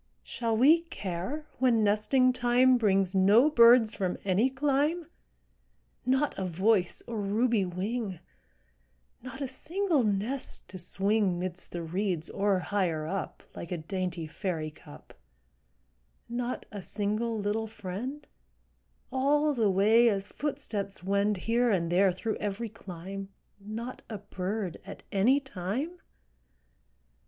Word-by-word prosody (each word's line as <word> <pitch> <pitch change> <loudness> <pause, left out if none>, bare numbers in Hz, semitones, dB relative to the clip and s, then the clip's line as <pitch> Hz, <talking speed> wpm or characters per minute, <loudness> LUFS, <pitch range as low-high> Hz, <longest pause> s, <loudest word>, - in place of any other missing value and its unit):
Shall 230 -2 -2
we 305 +8 +6
care 205 - -5
when 240 -4 +3
nesting 215 +5 +3
time 250 +1 +4
Brings 195 -3 +2
no 205 +10 +5
birds 235 -3 +7
from 185 -3 -1
any 200 +7 +3
clime, 290 +5 0 1.0
Not 265 +3 +2
a - - -1
voice 185 +2 +1
or 225 -3 -4
ruby 215 +1 +1
wing, 195 +2 -3 1.0
Not 255 +3 -8
a 275 - -1
single 335 +4 0
nest 215 +6 -2
to 185 - -8
swing 195 +1 +1
'Midst 180 0 -4
the 175 -1 -4
reeds 175 -1 -2
or 200 -1 +1
higher 180 -5 -1
up, 190 +4 -4
Like 170 - -7
a 180 - -1
dainty 175 0 -3
fairy 160 -1 -3
cup; 75 - -15 1.1
Not 240 +1 -3
a 205 -2 -6
single 215 +4 -2
little 210 +2 -1
friend, 220 +9 -6 0.9
All 290 +3 +2
the 225 -6 +2
way 220 +5 +5
as 200 -2 -2
footsteps 205 -10 -4
wend 200 +2 +1
Here 235 +2 +2
and 170 -5 +1
there 190 +2 +4
through 215 +5 -3
every 210 +3 -3
clime, 195 -1 -8 0.3
Not 220 +5 -6
a 215 - -4
bird 190 -1 -4
at 195 +2 -10
any 235 +8 +4
time? 265 - -4
210 Hz, 130 wpm, -29 LUFS, 190-245 Hz, 1.1 s, birds